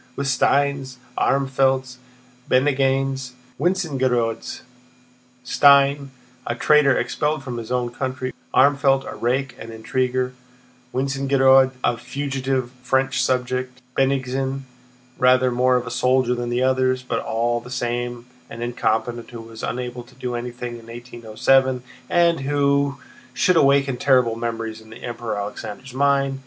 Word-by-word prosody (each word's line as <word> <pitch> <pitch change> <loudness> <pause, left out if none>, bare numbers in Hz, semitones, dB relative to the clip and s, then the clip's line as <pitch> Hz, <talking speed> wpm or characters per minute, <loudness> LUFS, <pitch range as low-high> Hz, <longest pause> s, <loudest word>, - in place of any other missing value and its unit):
With 140 - -2
Steins, 135 0 +1 0.2
Armfeldts, 130 -1 +1 0.5
Bennigsens, 135 -1 +1
and 125 - -26 0.2
Wintzingerodes! 135 -10 0 0.8
Stein, 140 +1 +4 0.4
a 120 - -1
traitor 150 +1 +4
expelled 150 -1 -1
from 125 -2 -5
his 115 +1 -8
own 125 -1 0
country; 130 0 -4 0.2
Armfeldt, 135 0 +3
a - - -7
rake 130 +1 -1
and 115 - -8
an 115 - -8
intriguer; 125 +2 -1 0.6
Wintzingerode, 135 0 +3
a 120 - +1
fugitive 130 0 -3
French 130 0 +1
subject; 125 0 -1 0.2
Bennigsen, 135 0 0 0.6
rather 125 0 +4
more 125 +1 +3
of 125 -1 0
a - - -6
soldier 125 -1 +2
than 120 -1 -3
the 120 +1 0
others, 130 0 +1
but 120 -2 -2
all 120 +1 -1
the 120 +1 -12
same 120 -1 -3 0.2
an 115 0 -6
incompetent 120 0 -1
who 120 -2 -9
was 115 0 -11
unable 125 0 -4
to 120 +1 -18
do 125 -1 -4
anything 120 0 -5
in 115 - -16
1807 120 +2 0 0.3
and 170 -1 +3
who 140 0 +1 0.4
should 185 - +3
awaken 140 -3 +3
terrible 125 -4 +3
memories 115 -1 -4
in 110 - -17
the 110 +2 -12
Emperor 120 -3 -4
Alexander's 105 +5 -6
mind.... 135 0 +1
130 Hz, 135 wpm, -22 LUFS, 120-135 Hz, 0.8 s, Stein